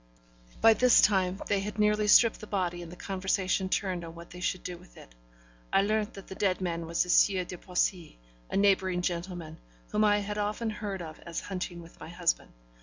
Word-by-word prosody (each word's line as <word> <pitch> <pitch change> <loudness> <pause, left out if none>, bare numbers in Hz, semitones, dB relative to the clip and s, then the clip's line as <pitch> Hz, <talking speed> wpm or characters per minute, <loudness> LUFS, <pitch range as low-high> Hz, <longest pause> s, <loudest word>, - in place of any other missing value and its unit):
By 225 - +8
this 250 +2 +5
time, 190 -2 +3
they 200 - +1
had 210 +2 -5
nearly 210 0 +2
stripped 230 +2 +6
the 215 - -9
body; 180 -4 -2
and 170 -1 -9
the - - -9
conversation 190 0 -1
turned 185 -3 -1
on 165 0 -9
what 170 0 -12
they 180 - -10
should 185 0 -2
do 180 - -5
with 180 +1 -18
it. - - -14 0.6
I 195 - +4
learnt 215 +1 -1
that 195 - -10
the - - -9
dead 190 -1 0
man 170 -3 -3
was 170 +1 +1
the 180 - -10
Sieur 185 +1 +4
de 180 - -7
Poissy, 180 - -2 0.3
a - - -1
neighbouring 190 -3 +2
gentleman, 175 -2 -4 0.3
whom 210 - +2
I 205 -1 +4
had 210 +1 -3
often 215 +2 -1
heard 200 -4 -5
of 155 -1 -9
as 170 -1 -5
hunting 180 -3 -5
with 165 - -16
my - - -9
husband. - - -1
185 Hz, 210 wpm, -29 LUFS, 175-205 Hz, 0.6 s, By